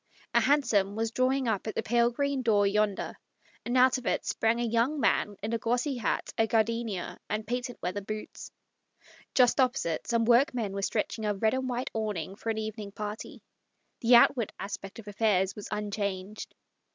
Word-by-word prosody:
A -, -, +6 dB
hansom 225 Hz, -9 st, +2 dB
was 225 Hz, 0 st, -1 dB
drawing 260 Hz, +1 st, +1 dB
up 220 Hz, -1 st, -1 dB
at 220 Hz, -, -4 dB
the -, -, -1 dB
pale 235 Hz, +1 st, +3 dB
green 280 Hz, +2 st, -1 dB
door 210 Hz, -4 st, +3 dB
yonder, 205 Hz, 0 st, 0 dB, 0.5 s
and 245 Hz, +2 st, 0 dB
out 255 Hz, +1 st, +5 dB
of 245 Hz, -, -8 dB
it -, -, 0 dB
sprang 225 Hz, +1 st, +1 dB
a -, -, 0 dB
young 235 Hz, +6 st, +1 dB
man 205 Hz, -6 st, +1 dB
in 220 Hz, +2 st, -2 dB
a 230 Hz, -, 0 dB
glossy 245 Hz, +4 st, 0 dB
hat, 235 Hz, -, -2 dB
a 225 Hz, -, +4 dB
gardenia, 225 Hz, -4 st, -1 dB
and 215 Hz, 0 st, -2 dB
patent 245 Hz, +1 st, -3 dB
leather 185 Hz, +3 st, -2 dB
boots. 215 Hz, +2 st, -7 dB, 0.8 s
Just 250 Hz, +1 st, +4 dB
opposite 245 Hz, -11 st, +1 dB
some 230 Hz, -1 st, +2 dB
workmen 240 Hz, -3 st, +3 dB
were 200 Hz, -, -3 dB
stretching 215 Hz, +1 st, -1 dB
a 205 Hz, -, 0 dB
red 220 Hz, +2 st, +1 dB
and 260 Hz, 0 st, -1 dB
white 245 Hz, +1 st, -3 dB
awning 205 Hz, -5 st, -3 dB
for 225 Hz, -, -5 dB
an 220 Hz, -, -1 dB
evening 215 Hz, -1 st, -5 dB
party. 210 Hz, +1 st, -7 dB, 0.6 s
The 240 Hz, 0 st, +5 dB
outward 235 Hz, -1 st, +5 dB
aspect 195 Hz, 0 st, -6 dB
of 225 Hz, -2 st, -11 dB
affairs 195 Hz, -2 st, +1 dB
was 210 Hz, -, -7 dB
un 210 Hz, -1 st, -3 dB
changed. 200 Hz, 0 st, -4 dB
225 Hz, 185 wpm, -29 LUFS, 205-245 Hz, 0.8 s, A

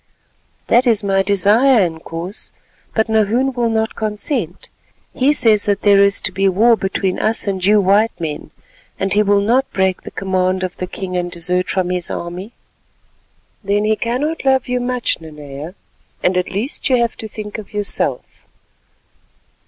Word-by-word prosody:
"That 245 Hz, +2 st, +3 dB
is 220 Hz, -3 st, +3 dB
my 195 Hz, -1 st, +2 dB
desire, 210 Hz, +6 st, +3 dB
Inkoos, 165 Hz, +3 st, -6 dB, 0.5 s
but 220 Hz, 0 st, +2 dB
Nahoon 220 Hz, +5 st, +1 dB
will 240 Hz, -2 st, 0 dB
not 220 Hz, 0 st, -1 dB
consent. 210 Hz, -, -3 dB, 0.4 s
He 265 Hz, +3 st, +2 dB
says 220 Hz, -8 st, +4 dB
that 205 Hz, -1 st, 0 dB
there 200 Hz, -1 st, +5 dB
is 200 Hz, 0 st, +3 dB
to 185 Hz, -, -1 dB
be 195 Hz, +1 st, +1 dB
war 225 Hz, +5 st, +4 dB
between 190 Hz, -2 st, -2 dB
us 220 Hz, +1 st, +2 dB
and 190 Hz, -3 st, -2 dB
you 210 Hz, +2 st, +5 dB
white 205 Hz, +1 st, +2 dB
men, 155 Hz, -3 st, -5 dB, 0.5 s
and 195 Hz, 0 st, 0 dB
he 210 Hz, -, +4 dB
will 200 Hz, -1 st, +3 dB
not 245 Hz, +6 st, +1 dB
break 190 Hz, -1 st, 0 dB
the -, -, -9 dB
command 185 Hz, -1 st, -1 dB
of 185 Hz, -1 st, -4 dB
the 185 Hz, -, -4 dB
king 185 Hz, 0 st, -6 dB
and 175 Hz, 0 st, -1 dB
desert 180 Hz, +1 st, -1 dB
from 185 Hz, -1 st, -1 dB
his 180 Hz, -1 st, -2 dB
army." 180 Hz, +6 st, -6 dB, 1.1 s
"Then 205 Hz, +1 st, 0 dB
he 215 Hz, 0 st, +2 dB
cannot 265 Hz, +9 st, -2 dB
love 265 Hz, -1 st, +2 dB
you 250 Hz, 0 st, -1 dB
much, 245 Hz, -6 st, -2 dB
Nanea, 150 Hz, +1 st, -9 dB, 0.5 s
and 180 Hz, -, +2 dB
at 180 Hz, 0 st, 0 dB
least 225 Hz, +9 st, -2 dB
you 260 Hz, -, +4 dB
have 235 Hz, -1 st, 0 dB
to 220 Hz, -, -6 dB
think 210 Hz, 0 st, -7 dB
of 205 Hz, -, -11 dB
yourself. 205 Hz, -1 st, -1 dB
200 Hz, 170 wpm, -18 LUFS, 185-225 Hz, 1.1 s, there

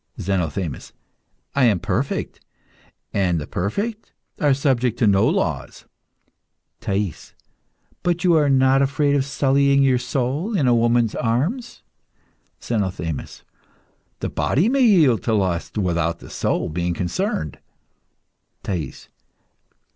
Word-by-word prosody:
ZENOTHEMIS. 90 Hz, -4 st, -3 dB, 0.6 s
I 140 Hz, -2 st, +3 dB
am 105 Hz, -6 st, +3 dB
perfect, -, -, -3 dB, 0.7 s
and 90 Hz, -4 st, +1 dB
the 75 Hz, -, -5 dB
perfect 210 Hz, -, -3 dB, 0.3 s
are 145 Hz, -2 st, +3 dB
subject 130 Hz, -4 st, +1 dB
to 120 Hz, -, +2 dB
no 100 Hz, -2 st, +4 dB
laws. -, -, -2 dB, 0.9 s
THAIS. 100 Hz, -3 st, -3 dB, 0.7 s
But 175 Hz, 0 st, 0 dB
are 160 Hz, -4 st, +4 dB
you -, -, +2 dB
not 135 Hz, 0 st, +4 dB
afraid 140 Hz, +1 st, +1 dB
of 140 Hz, -, +2 dB
sullying 140 Hz, 0 st, +3 dB
your 130 Hz, -2 st, +3 dB
soul 135 Hz, -, -1 dB
in 145 Hz, -, +2 dB
a 120 Hz, -, +5 dB
woman's 120 Hz, -1 st, +2 dB
arms? 160 Hz, -, -2 dB, 0.8 s
ZENOTHEMIS. 90 Hz, -, -3 dB, 0.8 s
The -, -, -2 dB
body 175 Hz, -, +1 dB
may 275 Hz, +1 st, +2 dB
yield 165 Hz, -, +5 dB
to 110 Hz, -, +2 dB
lust 95 Hz, -1 st, -1 dB
without 85 Hz, -4 st, 0 dB
the -, -, -13 dB
soul -, -, -1 dB
being 85 Hz, +2 st, -2 dB
concerned. 90 Hz, -, -2 dB, 1.0 s
THAIS. 85 Hz, -9 st, -5 dB
120 Hz, 115 wpm, -22 LUFS, 95-140 Hz, 1.0 s, a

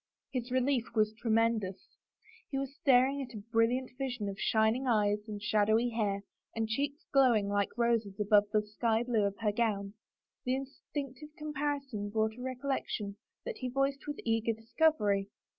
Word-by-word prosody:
His 250 Hz, -2 st, -3 dB
relief 255 Hz, -1 st, +1 dB
was 215 Hz, -1 st, +3 dB
tre 230 Hz, +1 st, -5 dB
mendous. 220 Hz, -4 st, +2 dB, 0.7 s
He 275 Hz, -, -2 dB
was 275 Hz, 0 st, -3 dB
staring 275 Hz, -2 st, +4 dB
at 250 Hz, -3 st, -7 dB
a 205 Hz, -, -7 dB
brilliant 245 Hz, +3 st, +2 dB
vision 245 Hz, -6 st, -2 dB
of 195 Hz, -, -7 dB
shining 220 Hz, +4 st, +2 dB
eyes 210 Hz, -3 st, +3 dB
and 210 Hz, -1 st, -5 dB
shadowy 215 Hz, +3 st, +2 dB
hair 205 Hz, -4 st, -1 dB, 0.3 s
and 225 Hz, -1 st, 0 dB
cheeks 280 Hz, +6 st, -2 dB
glowing 245 Hz, -7 st, +5 dB
like 205 Hz, +2 st, 0 dB
roses 230 Hz, -4 st, +1 dB
above 210 Hz, 0 st, +5 dB
the 215 Hz, -1 st, +2 dB
sky 225 Hz, +2 st, 0 dB
blue 230 Hz, -4 st, +1 dB
of 200 Hz, 0 st, -5 dB
her 210 Hz, -2 st, +2 dB
gown. 205 Hz, -3 st, 0 dB, 0.5 s
The 255 Hz, +1 st, +1 dB
instinctive 275 Hz, +1 st, -6 dB
com 300 Hz, 0 st, -5 dB
parison 275 Hz, -8 st, -2 dB
brought 220 Hz, 0 st, +1 dB
a 250 Hz, -, -10 dB
recollection 255 Hz, -6 st, -3 dB, 0.3 s
that -, -, -4 dB
he 255 Hz, -, -3 dB
voiced 275 Hz, +2 st, 0 dB
with 290 Hz, -, -3 dB
eager 225 Hz, 0 st, +1 dB
discovery. 220 Hz, -4 st, +1 dB
230 Hz, 165 wpm, -32 LUFS, 210-265 Hz, 0.7 s, glowing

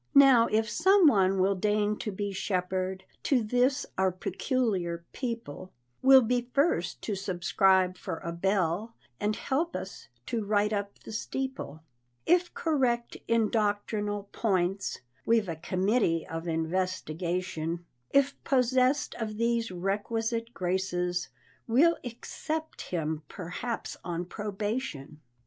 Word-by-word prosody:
Now 265 Hz, -4 st, +8 dB
if 220 Hz, +1 st, +1 dB
some 380 Hz, -, +4 dB
one 195 Hz, -8 st, +4 dB
will 190 Hz, +2 st, +3 dB
deign 210 Hz, +2 st, +1 dB
to 210 Hz, -, -4 dB
be 200 Hz, +1 st, -3 dB
shepherd 185 Hz, 0 st, -2 dB, 0.2 s
To 255 Hz, -5 st, +2 dB
this 250 Hz, +5 st, +2 dB
"our 190 Hz, 0 st, +3 dB
peculiar 185 Hz, -4 st, -1 dB
people," 230 Hz, -, -5 dB, 0.3 s
Will 265 Hz, -1 st, +8 dB
be 245 Hz, +1 st, 0 dB
first 305 Hz, +6 st, +1 dB
to 215 Hz, -, -2 dB
subscribe 185 Hz, 0 st, +2 dB
for 165 Hz, -, -5 dB
a 170 Hz, -, -5 dB
bell, 190 Hz, +4 st, 0 dB, 0.2 s
And 210 Hz, +1 st, 0 dB
help 320 Hz, +6 st, -1 dB
us 190 Hz, -, -6 dB, 0.2 s
to 230 Hz, -2 st, -2 dB
right 205 Hz, +1 st, +1 dB
up 200 Hz, -1 st, -3 dB
the -, -, -9 dB
steeple, 230 Hz, -, -4 dB, 0.4 s
If 355 Hz, +1 st, +3 dB
correct 255 Hz, -7 st, 0 dB
in 230 Hz, -2 st, +2 dB
doctrinal 205 Hz, -1 st, 0 dB
points 195 Hz, -2 st, 0 dB, 0.2 s
(We've 225 Hz, -3 st, +3 dB
a 165 Hz, -, -3 dB
committee 185 Hz, +1 st, +1 dB
of 165 Hz, +1 st, -5 dB
investigation), 170 Hz, 0 st, -2 dB, 0.2 s
If 280 Hz, 0 st, +2 dB
possessed 255 Hz, +1 st, +2 dB
of 215 Hz, -2 st, -3 dB
these 230 Hz, 0 st, +1 dB
requisite 225 Hz, +5 st, -2 dB
graces, 180 Hz, -2 st, -1 dB, 0.4 s
We'll 305 Hz, +9 st, +4 dB
accept 310 Hz, +6 st, -5 dB
him 160 Hz, -3 st, -2 dB
perhaps 200 Hz, +8 st, -5 dB
on 175 Hz, 0 st, -3 dB
probation. 205 Hz, -, -4 dB
205 Hz, 125 wpm, -29 LUFS, 185-240 Hz, 0.4 s, Now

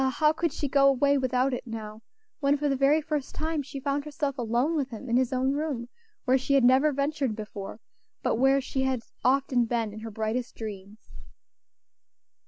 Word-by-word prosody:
how 305 Hz, 0 st, +4 dB
could 335 Hz, 0 st, -1 dB
she 290 Hz, -, -3 dB
go 275 Hz, 0 st, +4 dB
away 280 Hz, +1 st, +4 dB
without 260 Hz, 0 st, +1 dB
it 250 Hz, -, -4 dB
now, 220 Hz, -1 st, -7 dB, 0.4 s
when 285 Hz, -1 st, +2 dB
for 295 Hz, +1 st, 0 dB
the 275 Hz, -, +1 dB
very 280 Hz, +4 st, +3 dB
first 295 Hz, -2 st, -3 dB
time 315 Hz, -1 st, -1 dB
she 275 Hz, 0 st, -7 dB
found 280 Hz, +1 st, -1 dB
herself 290 Hz, -2 st, -3 dB
alone 245 Hz, +5 st, 0 dB
with 280 Hz, -4 st, -1 dB
him 240 Hz, +2 st, -8 dB
in 235 Hz, -, +1 dB
his 255 Hz, 0 st, +2 dB
own 260 Hz, +1 st, +1 dB
room, 280 Hz, -5 st, -2 dB, 0.4 s
where 260 Hz, 0 st, +4 dB
she 275 Hz, +2 st, +1 dB
had 270 Hz, -, +4 dB
never 260 Hz, +5 st, +5 dB
ventured 280 Hz, -4 st, -1 dB
before, 210 Hz, -1 st, -7 dB, 0.4 s
but -, -, +1 dB
where 270 Hz, +2 st, +4 dB
she 265 Hz, 0 st, -3 dB
had 260 Hz, -3 st, 0 dB, 0.2 s
often 255 Hz, -1 st, +3 dB
been 230 Hz, -2 st, -1 dB
in 215 Hz, -, -8 dB
her 225 Hz, +1 st, -6 dB
brightest 220 Hz, +3 st, -3 dB
dreams. 210 Hz, -1 st, -9 dB
265 Hz, 190 wpm, -27 LUFS, 235-280 Hz, 0.4 s, never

